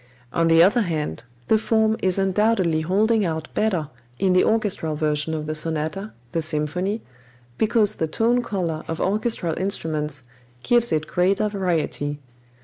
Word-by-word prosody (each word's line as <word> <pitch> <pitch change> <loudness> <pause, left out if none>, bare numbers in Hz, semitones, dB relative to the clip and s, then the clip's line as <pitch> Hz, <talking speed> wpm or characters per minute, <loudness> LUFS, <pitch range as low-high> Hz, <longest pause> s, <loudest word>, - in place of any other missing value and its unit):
On 165 0 +2
the 165 0 +6
other 210 +7 +4
hand, 150 - -3 0.2
the 220 - +4
form 220 0 +2
is 185 0 +2
undoubtedly 195 -4 +2
holding 210 +6 +2
out 160 -3 -3
better 180 -9 0 0.3
in 190 -1 +2
the 185 - +5
orchestral 205 -8 0
version 150 +1 0
of 155 -1 -4
the 155 - -3
sonata, 160 +6 -2 0.2
the 165 - -1
symphony, 160 +7 -1 0.6
because 220 -2 +3
the 160 - -2
tone 235 +9 +1
color 175 -9 -3
of 165 - -4
orchestral 205 -4 0
instruments 155 -7 -2 0.4
gives 240 -1 +2
it 155 0 0
greater 190 +6 +1
variety. 165 -7 -1
180 Hz, 145 wpm, -23 LUFS, 155-215 Hz, 0.6 s, the